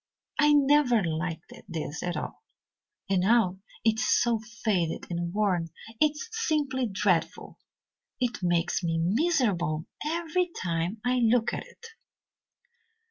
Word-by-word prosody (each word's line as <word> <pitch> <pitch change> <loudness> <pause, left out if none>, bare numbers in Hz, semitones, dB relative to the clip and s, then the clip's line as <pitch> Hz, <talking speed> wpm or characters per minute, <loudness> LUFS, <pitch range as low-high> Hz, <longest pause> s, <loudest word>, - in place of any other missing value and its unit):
I 295 0 +5
never 280 -6 +4
liked 165 +4 -3 0.2
this 160 -3 -4
at 175 -1 -2
all, - - -6 0.7
and 190 -1 +2
now 190 -2 +3 0.3
it 225 0 +3
is 245 - 0
so 235 -2 +3 0.2
faded 180 -7 0
and 170 0 -2
worn 190 -4 +1 0.3
it 305 -1 +4
is 305 +9 -7
simply 295 - 0
dreadful. 195 -4 -1 0.6
It 245 -4 -1
makes 175 0 +1
me 165 -2 -1
miserable 185 - +1 0.2
every 335 +3 0
time 170 +4 -2
I 250 +1 +2
look 235 0 +3
at - - -5
it." - - -16
215 Hz, 130 wpm, -28 LUFS, 175-270 Hz, 0.7 s, I